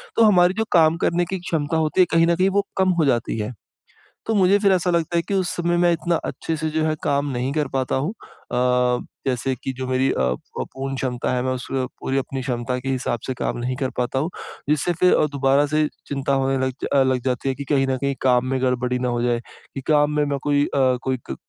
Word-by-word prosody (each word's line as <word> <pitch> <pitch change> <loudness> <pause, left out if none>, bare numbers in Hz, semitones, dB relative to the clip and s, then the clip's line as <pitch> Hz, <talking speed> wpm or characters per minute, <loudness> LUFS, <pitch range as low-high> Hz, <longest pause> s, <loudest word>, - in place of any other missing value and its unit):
तो 230 - +5
हमारी 180 -3 +5
जो 225 - +1
काम 165 -1 +5
करने 175 +1 +1
की 190 - -4
एक 185 - -6
क्षमता 160 0 0
होती 160 +4 +2
है, - - +6
कहीं 165 0 +4
न 170 - +3
कहीं 185 +3 +2
वो 200 +1 0
कम 190 0 +3
हो 155 - +4
जाती 120 -3 0
हैं। 105 +4 -3 0.7
तो 225 - 0
मुझे 195 0 +5
फिर 200 -2 +3
ऐसा 180 -1 +2
लगता 170 0 0
है, - - +3
कि 200 - -5
उस 185 -3 +1
समय 175 0 0
मैं 175 0 +4
इतना 170 0 0
अच्छे 165 - -3
से 155 +1 -2
जो 155 0 -1
है 155 0 0
काम 140 0 +1
नहीं 125 +2 -2
कर 150 -3 0
पाता 130 -1 0
हूँ। 145 +9 -1 0.4
अ, 125 0 +2 0.3
जैसे 130 +1 0
की 135 - -2
जो 130 0 -5
मेरी 130 +1 +1
अ - - -2
अ, 65 0 +2 0.2
प - - -2
पूर्ण 135 0 -4
क्षमता 130 -1 -2
है, 125 - 0
मैं 130 - 0
उसमें 130 +1 -3
पूरी 135 +1 -2
अपनी 135 0 -3
क्षमता 125 0 -2
के 135 +1 -5
हिसाब 125 -2 -1
से 130 - -1
काम - - -3
नहीं 125 +2 -2
कर 135 -2 -1
पाता 125 +2 0
हूँ। 155 +6 -1 0.4
जिससे 155 +4 +2
फ़िर 180 - +5
अ, - - +3
दोबारा 140 +1 +3
से 155 0 +1 0.2
चिंता 140 -1 -1
होने 135 0 +1
लग 130 - -2 0.2
अ, 135 -1 +5
लग 130 -1 +1
जाती 130 +1 -1
है 130 - -1
कि 140 - -6
कहीं 135 -2 +2
न 130 -1 0
कहीं 140 +1 -1
काम 125 -1 +3
में 130 -1 -1
गड़बड़ी 125 -1 0
ना 125 - -1
हो 120 0 -1
जाए। 120 -1 +1 0.4
कि 135 - -4
काम 150 -1 +3
में 150 - +3
मैं 140 -1 -2
कोई 145 0 +2
अ, 130 -2 +2
कोई 130 -1 0
ग - - -3
135 Hz, 255 wpm, -22 LUFS, 130-165 Hz, 0.7 s, है